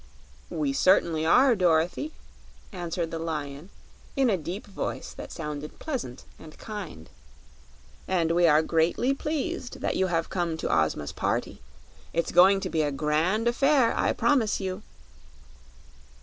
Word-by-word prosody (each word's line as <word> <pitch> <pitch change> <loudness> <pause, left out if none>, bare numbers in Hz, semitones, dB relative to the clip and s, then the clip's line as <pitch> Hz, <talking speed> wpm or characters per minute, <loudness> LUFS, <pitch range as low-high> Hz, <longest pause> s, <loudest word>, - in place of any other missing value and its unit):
"We 280 -2 -1
certainly 170 - +3
are, 255 +8 +6
Dorothy," 180 - +1 0.6
answered 175 -3 -3
the 165 - -4
Lion, 150 0 -5 0.5
in 265 -4 +3
a - - +3
deep 180 +4 -6
voice 200 - -5
that - - -9
sounded 150 -1 -6
pleasant 250 - -5 0.2
and 155 -1 -13
kind; 190 - -8 1.0
"and 170 -3 +1
we 170 0 +4
are 155 0 +5
greatly 170 +12 +1
pleased 275 -3 -3
that - - -1
you 190 - +2
have 165 -2 0
come 170 -3 -1
to - - 0
Ozma's 75 -2 0
party. - - -2 0.5
It's 170 - 0
going 190 +3 +6
to - - -3
be 160 - +1
a 145 -1 0
grand 155 +10 0
affair, 260 0 +3
I - - +1
promise 245 -7 +2
you." 190 0 -4
175 Hz, 140 wpm, -27 LUFS, 160-215 Hz, 1.0 s, are